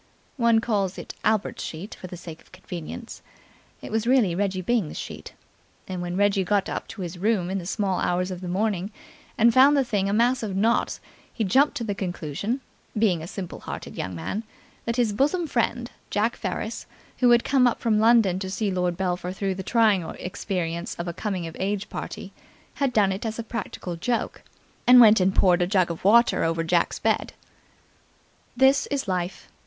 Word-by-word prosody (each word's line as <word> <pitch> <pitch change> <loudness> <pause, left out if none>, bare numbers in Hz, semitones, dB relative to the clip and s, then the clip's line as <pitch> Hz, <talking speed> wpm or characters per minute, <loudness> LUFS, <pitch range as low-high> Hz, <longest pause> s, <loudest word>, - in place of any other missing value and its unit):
(One 235 -2 +4
calls 200 -5 -1
it - - -7
Albert's 215 -1 0
sheet 165 +6 -6
for 185 - -9
the 180 - -8
sake 165 -2 -10
of - - -25
convenience. 185 +4 -8 0.6
It - - -7
was 225 +1 -1
really 245 -8 +4
Reggie 190 0 -1
Byng's 215 -6 0
sheet. - - -7 0.5
And 185 -1 -4
when 175 +1 -3
Reggie 200 -1 +3
got 200 +1 +1 0.2
to 215 - -8
his 175 0 -6
room 195 -3 +1
in 195 - -1
the 175 - -7
small 195 -2 -1
hours 180 +1 0
of 180 -1 -6
the 180 - -5
morning 195 +1 -1 0.5
and 230 +1 +5
found 275 +4 +6
the 275 - +4
thing 205 -5 -1
a - - 0
mass 240 +4 +3
of 205 -4 -3
knots 225 +4 +1 0.3
he 225 - -2
jumped 265 +9 +3
to 235 - -3
the 210 -3 -2
conclusion 190 - -3 0.4
being 195 -7 +2
a 160 - -7
simple 180 -1 -6
hearted - - -7
young 95 -1 -4
man 90 - -4 0.4
that 230 - -1
his 235 -4 +1
bosom 295 - +1
friend 240 -3 -1 0.2
Jack 215 +3 0
Ferris, 220 +1 -4 0.3
who 250 - +5
had 240 0 +5
come 260 -2 +4
up 240 - 0
from 220 -3 +2
London 220 -5 +4
to 190 -1 -4
see 200 +1 -1
Lord 180 -2 -1
Belpher 180 -1 -2
through 195 0 -2
the 190 - -5
trying 215 -2 +3
experience 175 -2 -4
of 170 - -5
a 170 - -3
coming 190 -2 -3
of 165 - -7
age 200 +1 -2
party, - - -6 0.5
had 275 -2 +2
done 205 -4 +3
it 190 +2 -4
as 220 -1 -3
a 230 - -3
practical 215 -6 -5
joke, 235 +8 -2 0.5
and 250 0 +9
went 220 -3 +8
and 190 +1 +2
poured 180 -2 +4
a 175 - +2
jug 185 -3 +2
of 165 - -7
water 235 +5 +5
over 165 0 0
Jack's 170 +1 +1
bed. - - 0 1.2
That 265 +2 +4
is 280 -4 -2
Life. 180 0 -3
200 Hz, 195 wpm, -25 LUFS, 180-230 Hz, 1.2 s, and